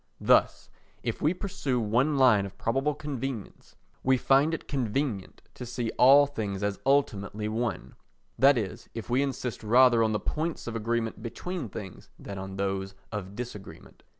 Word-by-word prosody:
Thus, - - +3 0.3
if - - -3
we 155 - +3
pursue 150 - -2
one 125 +7 +1
line 110 -7 +5
of 100 - -14
probable 135 +5 0
convenience, 135 -6 -6 0.3
we 130 0 +3
find 140 +5 +3
it 165 - -5
convenient 125 -5 -2
to - - -8
see 120 -1 -3
all 140 +3 +8
things 105 -8 -4
as 100 -1 -1
ultimately 105 -6 +1
one: 110 - -3 0.5
that 135 +1 +6
is, 105 -5 -4
if 115 +1 -6
we 125 +2 +3
insist 130 -4 -3
rather 120 +1 +5
on 110 -1 +2
the 105 - 0
points 160 +1 -3
of 115 - -5
agreement 115 0 -2
between 145 - -5
things 95 -2 -9
than 100 -1 -7
on 95 0 -6
those 95 0 -2 0.2
of 100 -2 -6
disagreement. 110 -4 -9
120 Hz, 160 wpm, -28 LUFS, 105-135 Hz, 0.5 s, all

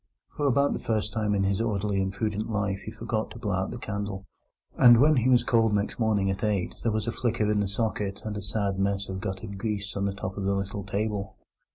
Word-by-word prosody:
For 145 - -1
about 140 +2 +3
the - - -3
first 110 -2 -1
time 105 -2 +1
in 100 - +2
his 95 +1 +1
orderly 105 -3 0
and 95 0 -1
prudent 105 +2 -2
life 100 -3 -1
he - - -5
forgot 110 -1 -2
to 110 - -10
blow 105 -4 -2
out 95 0 0
the 120 - -5
candle, 100 -3 -4 0.5
and 120 -2 +8
when 150 +2 +5
he 125 +1 +3
was 125 -2 +5
called 115 -3 +3
next 100 +3 -1
morning 105 -4 +2
at 95 +4 -4
eight 105 -4 0
there 115 - +1
was 110 0 0
still 115 - -2
a - - -11
flicker 115 -3 +1
in 105 - +2
the 100 - +1
socket 100 -1 -2
and 110 -1 -3
a 105 - -4
sad 100 -1 -1
mess 100 0 0
of 95 0 -4
guttered 95 +2 -5
grease 105 -2 -3
on 100 0 0
the 100 -1 -1
top 95 -1 -5
of 100 - -2
the 100 +1 +1
little 100 +1 -3
table. 105 0 -2
105 Hz, 250 wpm, -27 LUFS, 100-110 Hz, 0.5 s, and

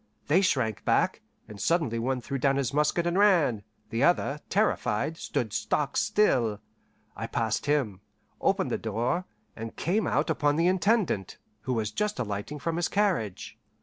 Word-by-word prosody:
They 170 +6 +5
shrank 125 - 0
back, - - +1 0.3
and 105 -2 -9
suddenly 155 -9 +1
one 125 +2 -1
threw 135 +3 -4
down 135 +1 +2
his 135 -1 -1
musket 150 +4 +1
and 175 +3 +1
ran; 170 - +4 0.3
the 115 - -1
other, 150 -3 +2
terrified, 160 - +1
stood 110 -8 -3
stock 110 +7 -1
still. 125 - +2 0.6
I - - -4
passed 115 +4 -1
him, 125 -10 0 0.4
opened - - +1
the - - -1
door, 130 +11 -1 0.3
and 115 0 -7
came 205 +6 0
out 150 +4 +1
upon 145 -2 +1
the 165 +2 +2
Intendant, 185 - +1 0.3
who 130 - 0
was 110 -3 -1
just 210 0 -1
alighting 105 +5 -4
from 165 +3 -2
his 175 - +1
carriage. 180 - -1
145 Hz, 160 wpm, -28 LUFS, 115-175 Hz, 0.6 s, They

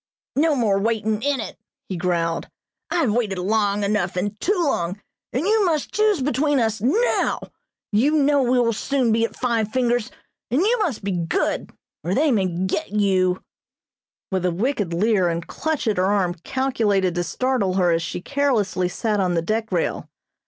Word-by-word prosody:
"No 305 +2 +3
more 210 -6 +2
waitin' 220 0 0
in 285 +1 0
it," 220 - -6 0.3
he 190 - -4
growled. 170 -2 -1 0.4
"I 335 - -2
have 255 -9 +2
waited 215 -5 0
long 205 +2 +1
enough, 200 -3 0
and 200 +3 -2
too 395 - +1
long, 185 - -1 0.3
and 260 +7 -1
you 430 +1 +3
must 320 -6 0
choose 420 -5 +2
between 290 +1 +1
us 220 -2 0
now. 410 - +1 0.5
You 225 +7 +3
know 285 -1 +3
we 250 0 +2
will 230 -1 +2
soon 255 +1 0
be 225 +1 +2
at - - -7
'Five 230 -4 0
Fingers,' 245 0 0 0.4
and 250 +5 +1
you 455 +5 +2
must 320 - -1
be 200 - -1
good 170 -2 -1 0.3
or 175 +4 -1
they 300 +1 +3
may 200 -6 +2
get 185 - -2
you," 190 -3 +1 0.9
with 190 -2 0
a 180 - +2
wicked 205 0 -1
leer 190 0 +2
and 170 0 -3
clutch 315 -5 -3
at 215 - +1
her 185 - +2
arm 190 -4 +1
calculated 215 -9 +1
to 175 0 -1
startle 245 -3 0
her 180 -2 +3
as 165 0 +1
she 170 +1 -4
carelessly 210 -10 0
sat 210 +2 -1
on 180 -2 +1
the 165 - +1
deck 220 +3 -2
rail. 175 -3 -1
220 Hz, 180 wpm, -22 LUFS, 185-265 Hz, 0.9 s, No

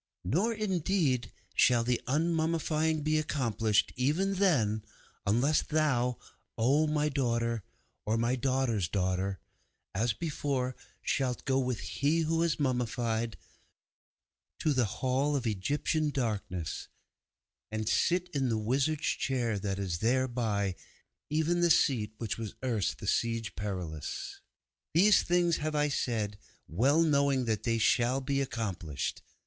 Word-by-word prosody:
'Nor, 200 - +1
indeed, 180 - 0 0.2
shall 120 -2 +4
the 120 0 0
unmummying 160 +1 +1
be 155 +1 +2
accomplished, 115 -8 +1
even 155 +10 +1
then, 125 - +2 0.4
unless 125 +9 +3
thou, 125 -6 +1 0.4
O 140 +7 +3
my 150 0 +1
daughter, 115 -5 0 0.4
or 110 +2 0
my 120 +2 +1
daughter's 130 -7 0
daughter 95 +1 -1 0.5
as 110 +4 +1
before, 140 -4 -2 0.3
shalt 130 -3 -1
go 135 -1 +2
with 125 -3 -1
He 150 +4 0
who 165 +1 0
was 165 -2 +1
mummied 120 -4 -1 1.2
to 155 - +1
the 130 -3 +2
Hall 130 +7 0
of 130 -3 -1
Egyptian 145 - 0
Darkness 105 - -3 0.8
and 110 0 -3
sit 180 +9 +2
in 140 -6 0
the 110 - +1
Wizard's 135 +8 0
Chair 120 -6 0
that 100 -1 -2
is 95 -4 -2
thereby, 115 -5 +1 0.6
even 160 +3 +1
the 175 - +4
seat 110 -9 +2
which 115 -1 -3
was 110 -2 -5
erst 115 -7 0
the - - -8
Siege 115 -1 0
Perilous. 90 -7 -5 0.5
These 200 +5 +6
things 175 -1 +2
have 155 0 -2
I 150 0 +2
said, 110 -7 -1 0.3
well 135 - +3
knowing 140 -4 +2
that 110 -3 0
they 115 0 0
shall 120 +3 +3
be 135 +1 -1
accomplished. 95 - -3
130 Hz, 130 wpm, -30 LUFS, 110-150 Hz, 1.2 s, These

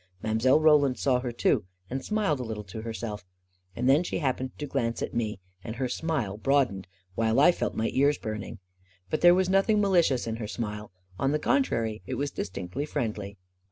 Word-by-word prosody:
Mile. 110 +6 +3
Roland 150 -4 +4
saw 130 -3 +2
her 125 -1 -3
too, 115 -2 +1 0.2
and 130 +4 -4
smiled 210 -10 0
a - - -3
little 110 -2 -5
to 100 +3 -8
herself; 110 -3 -5 0.5
and 125 +2 -1
then 140 +4 +5
she - - -3
happened 130 -3 -1
to 150 - -4
glance 115 -4 -1
at - - -4
me, 110 -4 -2 0.2
and 110 - -6
her 130 +1 -1
smile 125 -7 -2
broad 135 +2 +2
ened, 95 -1 -8 0.3
while 115 +4 +1
I 150 +5 +7
felt - - -3
my 110 - 0
ears 140 +2 +3
burning. 110 -1 -5 0.5
But - - 0
there 175 0 +8
was 185 0 +2
nothing 195 +3 +3
malicious 175 -10 +3
in 115 -1 -3
her 110 -2 -5
smile. 105 -1 -5 0.3
On 135 +1 +1
the - - +3
contrary, 115 - 0
it 130 - -3
was 140 +1 -2
distinctly 95 +9 -4
friendly. 105 -8 -3
125 Hz, 195 wpm, -27 LUFS, 110-145 Hz, 0.5 s, there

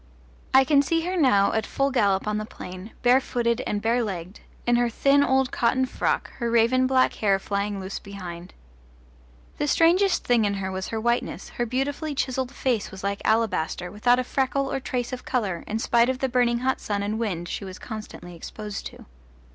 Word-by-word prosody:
I 265 0 +7
can 280 +1 +4
see 330 +4 0
her 360 +3 -2
now 250 - +4
at 220 -2 -1
full 275 0 0
gallop 200 -6 +2
on 210 0 -1
the - - -3
plain, 185 -1 -9
bare 250 +2 +5
footed 235 -1 0
and 205 0 -2
bare 235 +2 +2
legged, 190 -3 -5 0.3
in 240 - +3
her 240 0 +2
thin 280 +4 +3
old 265 -1 +2
cotton 255 +2 +2
frock, 255 - -1
her 235 -2 -1
raven 235 +3 +3
black 260 0 +3
hair 200 -3 +2
flying 200 +1 -2
loose 190 +1 -5
behind. 180 -3 -9 1.0
The 295 - 0
strangest 355 +6 +3
thing 240 -2 +3
in 200 -1 +1
her 190 -1 -3
was 190 0 -4
her 225 - -3
whiteness: 235 +2 -1
her 240 - -3
beautifully 285 +5 -2
chiselled 260 -1 -1
face 250 -6 -1
was 190 -1 -10
like 200 0 -2
alabaster, 205 -5 0
without 245 +4 +3
a 255 - 0
freckle 270 +1 -1
or 270 - 0
trace 250 -1 -3
of 250 - -5
colour 200 -9 -2
in 215 - -2
spite 235 +1 +3
of 260 - 0
the 265 - 0
burning 240 -1 +2
hot 260 +1 0
sun 200 -1 -2
and 215 +2 -2
wind 180 -7 -2
she - - -4
was 185 -1 -8
constantly 215 -5 -8
exposed 205 +4 -7
to. - - -13
235 Hz, 200 wpm, -25 LUFS, 200-260 Hz, 1.0 s, I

